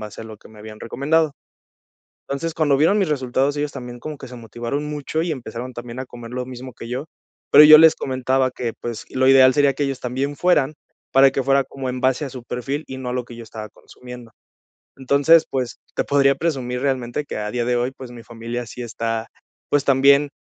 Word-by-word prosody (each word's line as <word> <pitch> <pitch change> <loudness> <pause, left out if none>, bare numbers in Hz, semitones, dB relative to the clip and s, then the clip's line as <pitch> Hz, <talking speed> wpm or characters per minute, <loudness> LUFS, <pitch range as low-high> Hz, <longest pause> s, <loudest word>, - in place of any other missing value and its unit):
base 105 -1 -8
a 115 - -8
lo 110 -1 -10
que - - -18
me 110 - -16
habían 105 0 -11
recomendado. 150 +6 0 1.0
Entonces, 160 +4 -3
cuando 150 -4 +2
vieron 165 +8 +3
mis 195 -5 +1
resultados, 135 0 0
ellos 145 0 -2
también 125 -2 -8
como 155 +3 -7
que 135 - -10
se 125 - -10
motivaron 120 +5 -5
mucho 150 +1 -3
y 170 0 -1
empezaron 125 -1 -7
también 120 +1 -8
a 130 - -4
comer 120 -2 -11
lo 125 0 -4
mismo 130 0 -9
que 115 - -10
yo, 125 +3 -4 0.5
pero 150 - +10
yo 155 0 +11
les 160 0 +7
comentaba 130 0 0
que, 125 -2 -4
pues, 120 -2 -5
lo 130 0 +2
ideal 130 -1 +7
sería 145 -1 +3
que 145 - -2
ellos 135 -2 -2
también 135 +3 -3
fueran, 155 -5 +2 0.4
para 135 0 +6
que 135 0 -1
fuera 135 +1 +2
como 135 0 -6
en 125 0 -4
base 130 +2 +1
a - - -6
su 125 -1 -9
perfil 135 +6 -4
y 130 - -7
no 130 -1 -5
a - - -3
lo 125 -1 -3
que 120 - -11
yo 115 - -9
estaba 110 -1 -8
consumiendo. 125 +1 -13 0.7
Entonces, 140 +5 +4
pues 130 -3 -3 0.2
te - - -1
podría 140 -1 +3
presumir 130 -6 -2
realmente 130 0 -2
que - - -6
a 105 0 -3
día 120 -1 -1
de 125 0 +1
hoy, 120 +1 0
pues 130 -2 -11
mi 120 - -11
familia 120 +1 -6
sí 120 - -10
está, 115 -1 -3 0.4
pues 145 -1 +1
también 140 +1 +4
130 Hz, 225 wpm, -21 LUFS, 120-140 Hz, 1.0 s, yo